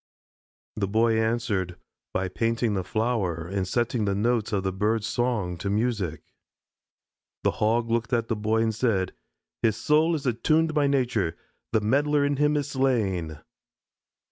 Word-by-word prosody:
The 100 -2 0
Boy 110 +2 +2
answered 110 -6 0 0.4
by 95 - -1
painting 115 +3 0
the 95 -2 -1
flower 105 -7 -1
and 95 0 -2
setting 120 +1 0
the 100 -1 0
notes 115 +1 +1
of 100 -3 0
the 95 -1 -1
bird's 105 +3 0
song 110 -7 -1
to 100 - -3
music. 100 -8 -1 1.2
The - - +3
Hog 115 +2 +2
looked 115 +1 0
at 115 -2 +1
the 115 - 0
boy 110 +2 +1
and 110 -1 0
said: 105 -5 0 0.5
"His 110 -2 +2
soul 155 +8 +3
is 145 -2 -5
attuned 155 +7 +2
by 150 -2 +3
nature. 120 -11 0 0.3
The 110 - +2
meddler 145 +6 +2
in 145 -1 0
him 150 +1 +3
is 145 -1 -2
slain." 100 - 0
110 Hz, 155 wpm, -26 LUFS, 100-125 Hz, 1.2 s, The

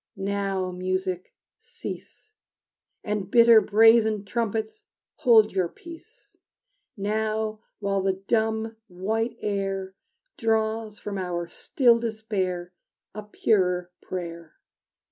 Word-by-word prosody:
Now, 195 -1 -2
music, 185 0 -3 0.3
cease, 430 - -9 0.7
And 210 -2 -3
bitter 230 -1 +7
brazen 220 -1 +4
trumpets 225 - -3 0.3
hold 220 -3 +5
your 185 -2 +1
peace! 340 - -14 0.6
Now, 215 +1 -1 0.2
while 200 -1 -1
the 190 0 +1
dumb, 220 +3 -1
white 220 +6 -2
air 195 -2 -2 0.5
Draws 220 -1 0
from 200 -2 -5
our 175 -2 -2
still 235 +6 +2
despair 200 -6 -3 0.4
A 215 - -6
purer 180 -4 +1
prayer. 170 -3 -7
210 Hz, 95 wpm, -26 LUFS, 190-225 Hz, 0.7 s, bitter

